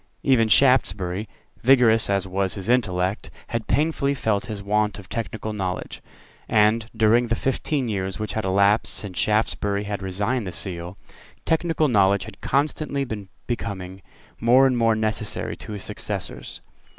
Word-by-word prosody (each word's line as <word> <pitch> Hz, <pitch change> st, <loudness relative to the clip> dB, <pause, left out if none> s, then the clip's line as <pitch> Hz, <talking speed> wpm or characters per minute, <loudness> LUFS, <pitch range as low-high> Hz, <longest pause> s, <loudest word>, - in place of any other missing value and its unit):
Even 125 Hz, -5 st, +4 dB
Shaftesbury, 105 Hz, -5 st, +2 dB, 0.3 s
vigorous 120 Hz, -4 st, +5 dB
as 100 Hz, -1 st, +1 dB
was 95 Hz, 0 st, -1 dB
his 100 Hz, +1 st, -5 dB
intellect, 95 Hz, -5 st, 0 dB, 0.2 s
had 115 Hz, -2 st, -3 dB
painfully 145 Hz, -2 st, +1 dB
felt 110 Hz, -6 st, -1 dB
his 105 Hz, -2 st, -6 dB
want 105 Hz, +1 st, 0 dB
of 100 Hz, -, -11 dB
technical 110 Hz, -2 st, -4 dB
knowledge; 95 Hz, -3 st, -4 dB, 0.5 s
and, 110 Hz, +1 st, +3 dB
during 115 Hz, +2 st, +4 dB
the 115 Hz, -, +1 dB
fifteen 135 Hz, +1 st, -1 dB
years 95 Hz, -3 st, -2 dB
which 110 Hz, -1 st, -4 dB
had 110 Hz, -, -2 dB
elapsed 100 Hz, +3 st, +2 dB
since 100 Hz, -4 st, -4 dB
Shaftesbury 105 Hz, -1 st, 0 dB
had 100 Hz, -1 st, -4 dB
resigned 100 Hz, +5 st, -2 dB
the -, -, -4 dB
Seal, 90 Hz, 0 st, -6 dB, 0.5 s
technical 160 Hz, -1 st, +1 dB
knowledge 100 Hz, -5 st, +3 dB
had -, -, -12 dB
constantly 140 Hz, 0 st, 0 dB
been 105 Hz, -5 st, -6 dB, 0.2 s
becoming 95 Hz, -5 st, -5 dB, 0.4 s
more 125 Hz, +4 st, +5 dB
and 130 Hz, -1 st, +3 dB
more 115 Hz, -2 st, +3 dB
necessary 110 Hz, -1 st, -1 dB
to 110 Hz, -, -8 dB
his 100 Hz, -, -5 dB
successors. -, -, -3 dB
105 Hz, 150 wpm, -23 LUFS, 100-120 Hz, 0.5 s, vigorous